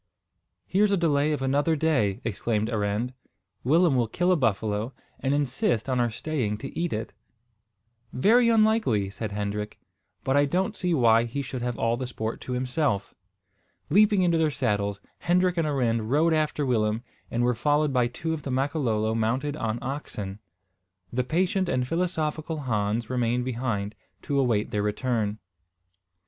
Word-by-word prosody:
"Here's 200 +3 +2
a 200 - +3
delay 150 -3 +2
of 145 -3 -1
another 145 +4 +2
day," 135 -11 +1
exclaimed 110 0 -1
Arend. 105 +3 -1 0.5
"Willem 160 +3 +4
will 120 -2 +2
kill 180 +10 +1
a - - +5
buffalo, 110 - 0 0.3
and 135 - 0
insist 135 -5 0
on 130 -2 0
our 120 -1 +2
staying 115 -3 -2
to 135 +5 -8
eat 170 0 -1
it." 110 +1 -4 1.0
"Very 230 - +4
likely," 215 - +2
said 110 +1 -5
Hendrik; 105 +1 -3 0.5
"but 135 - +1
I 145 0 +5
don't 190 +8 0
see 180 -3 0
why 115 -3 +4
he 140 +4 -3
should 130 -2 -5
have 120 -1 -2
all 115 +1 +1
the 130 0 -4
sport 110 -2 -4
to 125 - -5
himself." 125 -5 -1 0.8
Leaping 205 +1 +5
into 170 -2 +3
their 160 -1 +3
saddles 100 -7 -1 0.2
Hendrik 180 +1 +2
and 165 -3 +1
Arend 115 -6 0
rode 160 +5 +3
after 150 -2 0
Willem, 110 -2 +1 0.3
and 120 +1 0
were 125 0 +3
followed 145 +4 +1
by 125 -2 +3
two 160 +7 -3
of 160 - -4
the 140 - -6
Makololo 130 -5 0
mounted 125 +6 0
on 115 -6 -2
oxen. 105 -7 -5 0.7
The 125 +1 +1
patient 185 - 0
and 125 -6 0
philosophical 160 -2 -2
Hans 110 -2 -1
remained 125 0 0
behind, 115 -5 -2 0.3
to 140 -1 0
await 115 -6 +1
their 105 - 0
return. 105 0 -1
130 Hz, 160 wpm, -26 LUFS, 110-155 Hz, 1.0 s, a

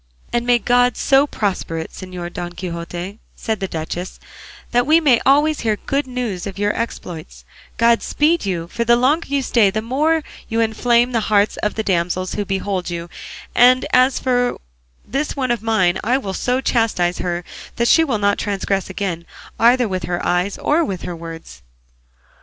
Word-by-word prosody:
"And 240 0 0
may 245 0 +5
God 245 +2 +2
so 275 +1 +4
prosper 195 - -2
it, 160 - -5
Señor 180 -2 -7
Don 175 -1 -5
Quixote," 175 +3 -6 0.2
said 220 -2 -3
the 195 - -2
duchess, 170 +2 -5 0.5
"that 245 +1 +2
we 315 +2 +6
may 275 -7 +3
always 295 +3 +4
hear 220 -2 0
good 280 0 -1
news 240 -8 -4
of 195 - -7
your 205 +1 0
exploits; 160 - -6 0.3
God 230 0 +4
speed 320 +3 +1
you; 175 -4 -2
for 235 +6 -2
the 235 +1 +4
longer 275 +7 +2
you 280 -1 0
stay, 230 -5 +3
the 210 +3 -2
more 305 +7 +1 0.3
you 225 0 -1
inflame 235 +2 +2
the 235 - +1
hearts 205 0 +3
of 210 - -2
the 220 - -2
damsels 180 -1 -1
who 205 - -2
behold 190 -1 -2
you; 170 0 -6 0.4
and 250 +1 +5
as 255 +1 +4
for 245 -1 0 0.5
this 275 +3 -2
one 260 -3 -1
of 240 - -1
mine, 215 -5 +2
I 245 +5 +2
will 200 -8 -4
so 250 +6 0
chastise 215 -9 +1
her 175 -1 -2 0.3
that 235 - +1
she 325 - +6
will 265 -8 0
not 205 0 +1
transgress 195 -1 -2
again, 185 -3 -4 0.3
either 240 +1 +4
with 185 -3 -3
her 175 0 -3
eyes 180 +3 0
or 315 +3 +2
with 190 - -4
her 175 - -5
words." 165 0 -10
220 Hz, 180 wpm, -19 LUFS, 180-250 Hz, 0.5 s, we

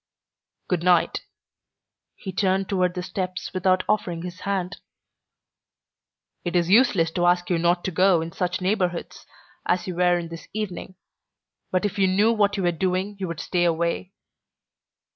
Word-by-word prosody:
"Good 180 -3 0
night." 175 -1 +2 0.9
He 190 - -7
turned 190 0 +1
toward 180 -2 0
the 180 - -3
steps 185 0 -4
without 185 0 +2
offering 175 -5 -1
his 180 0 -7
hand. 190 -2 -2 1.7
"It 175 0 -3
is 175 0 +2
useless 200 -8 +4
to 175 +1 +1
ask 175 0 +2
you 170 - +2
not 175 +1 +2
to 190 - -2
go 185 0 +4
in 165 +1 -4
such 180 +2 -2
neighborhoods 185 -2 -2 0.4
as 180 0 0
you 185 - -4
were 175 0 +3
in 170 -1 -5
this 165 -1 -9
evening, 195 -3 -5 0.7
but 185 +1 0
if 205 0 -2
you 190 - +4
knew 205 +5 +3
what 205 -2 +2
you 195 - -1
were 175 - +3
doing 185 +4 -1
you 190 - -2
would 170 -1 -5
stay 175 -2 0
away." 170 +2 0
180 Hz, 160 wpm, -24 LUFS, 175-190 Hz, 1.7 s, useless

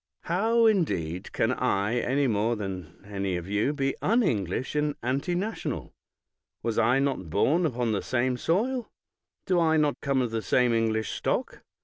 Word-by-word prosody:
How, 225 +7 +2
indeed, 90 - 0
can - - +1
I, 100 +5 0
any 135 +4 +1
more 115 0 +1
than 95 -4 -7
any 100 -2 -2
of 90 0 -5
you, 105 +7 +1
be 135 -2 -1
unEnglish 130 - +1
and 150 -1 -1
antinational? 175 - -2 0.7
Was 115 -1 0
I 120 +3 +4
not 135 - -1
bom 155 - +2
upon 120 -4 -1
the 105 - 0
same 130 0 0
soil? 230 - 0 0.6
Do 180 -2 +2
I 160 -1 +3
not 150 -2 +1
come 135 -2 +1
of 120 - -3
the 115 -1 -1
same 125 +1 +2
English 110 -1 0
stock? - - -2
125 Hz, 155 wpm, -27 LUFS, 105-160 Hz, 0.7 s, I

